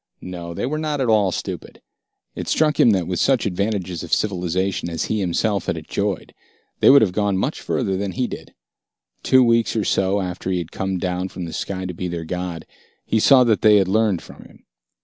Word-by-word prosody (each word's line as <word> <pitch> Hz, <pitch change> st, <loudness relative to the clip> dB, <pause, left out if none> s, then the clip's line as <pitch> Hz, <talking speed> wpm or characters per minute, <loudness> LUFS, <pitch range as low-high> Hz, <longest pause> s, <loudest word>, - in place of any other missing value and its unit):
No, 85 Hz, -2 st, -7 dB
they -, -, -2 dB
were 155 Hz, +4 st, -2 dB
not 150 Hz, -2 st, -2 dB
at 130 Hz, -3 st, 0 dB
all 105 Hz, -4 st, +3 dB
stupid. -, -, -6 dB, 0.5 s
It -, -, -6 dB
struck 155 Hz, -1 st, +1 dB
him -, -, +6 dB
that 95 Hz, -5 st, +2 dB
with 90 Hz, -1 st, -2 dB
such 135 Hz, -4 st, +2 dB
advantages 95 Hz, -3 st, -2 dB
of -, -, -8 dB
civilization 95 Hz, -2 st, -1 dB
as 80 Hz, -2 st, -2 dB
he 110 Hz, -, -1 dB
himself 100 Hz, +2 st, -1 dB
had -, -, -1 dB
enjoyed, -, -, -3 dB, 0.5 s
they -, -, +6 dB
would 140 Hz, -2 st, +8 dB
have 100 Hz, -, +1 dB
gone 100 Hz, 0 st, 0 dB
much 135 Hz, -, -2 dB
further 100 Hz, -7 st, -1 dB
than 100 Hz, 0 st, -3 dB
he 125 Hz, -, -1 dB
did. -, -, -8 dB, 0.7 s
Two 130 Hz, -1 st, +5 dB
weeks 115 Hz, -1 st, +2 dB
or 110 Hz, -, +1 dB
so 95 Hz, +1 st, +1 dB
after 90 Hz, 0 st, -4 dB
he 95 Hz, -, 0 dB
had 85 Hz, -2 st, -5 dB
come 95 Hz, -1 st, -2 dB
down 90 Hz, +1 st, -2 dB
from 90 Hz, -2 st, -6 dB
the 80 Hz, -, -7 dB
sky 95 Hz, -1 st, -4 dB
to 90 Hz, -, -4 dB
be 90 Hz, +2 st, -4 dB
their 85 Hz, -2 st, -5 dB
god, 90 Hz, -1 st, -5 dB, 0.4 s
he 110 Hz, -, +1 dB
saw 130 Hz, +3 st, +6 dB
that 115 Hz, -4 st, +2 dB
they 105 Hz, -1 st, +6 dB
had 95 Hz, -2 st, +4 dB
learned 105 Hz, -2 st, +1 dB
from -, -, -13 dB
him. -, -, -18 dB
95 Hz, 215 wpm, -21 LUFS, 90-110 Hz, 0.7 s, would